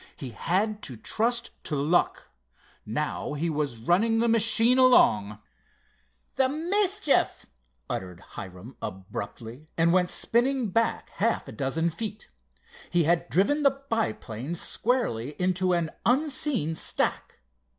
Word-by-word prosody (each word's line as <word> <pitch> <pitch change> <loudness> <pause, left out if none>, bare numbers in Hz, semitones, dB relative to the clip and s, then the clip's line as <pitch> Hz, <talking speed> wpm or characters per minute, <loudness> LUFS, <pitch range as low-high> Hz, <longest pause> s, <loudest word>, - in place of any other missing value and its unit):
He 130 -3 -7
had 205 - -1
to 125 - -6
trust 235 - 0
to 150 - -1
luck. 150 +5 +1 0.6
Now 145 +7 -3
he 160 +3 -1
was 145 -5 -2
running 185 - +2
the 235 +1 +2
machine 230 +2 +4
along. 105 - +5 1.0
"The 265 -1 +3
mischief!" 360 +3 +1 0.4
uttered 90 -2 -5
Hiram 95 +3 -9
abruptly, 110 +8 -7
and 170 +1 +3
went 180 -1 +3
spinning 245 0 +1
back 230 +4 0
half 230 +2 0
a - - -7
dozen 160 +5 -1
feet. 215 +3 -6 0.6
He 175 0 +2
had 170 +2 +1
driven 245 - +2
the 275 -1 +2
biplane 130 - -2
squarely 160 - -1
into 185 0 +1
an 170 -2 0
unseen 260 - +1
stack. - - -2
180 Hz, 120 wpm, -27 LUFS, 140-235 Hz, 1.0 s, along